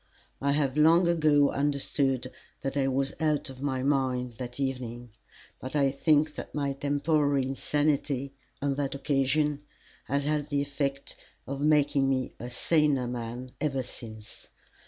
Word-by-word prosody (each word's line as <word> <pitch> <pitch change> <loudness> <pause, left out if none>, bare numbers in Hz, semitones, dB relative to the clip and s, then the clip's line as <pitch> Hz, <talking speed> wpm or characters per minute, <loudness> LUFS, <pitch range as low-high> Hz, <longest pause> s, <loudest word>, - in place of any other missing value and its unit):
I 140 +1 +2
have 140 -1 0
long 165 +3 +6
ago 155 -4 +4
understood 135 -2 0 0.3
that 135 0 -3
I 135 -1 +2
was 135 +1 0
out 150 -3 0
of 130 0 -12
my 130 -2 -1
mind 130 -3 0
that 125 +1 -6
evening, 120 -3 -3 0.5
but 130 +3 -6
I 140 -2 +3
think 150 +2 +2 0.2
my 140 -2 0
temporary 145 0 +1
insanity 140 0 0 0.3
on 140 -1 +1
that 140 -1 -1
occasion 140 +1 +1 0.4
has 140 +1 0
had 150 0 -1
the 140 -1 +1
effect 140 -1 -3 0.3
of 140 +1 -4
making 145 -2 +3
me 130 -1 -1
a 120 - -6
saner 145 0 +2
man 120 +1 -5
ever 135 -4 0
since. 110 -3 -8
140 Hz, 140 wpm, -28 LUFS, 130-145 Hz, 0.5 s, long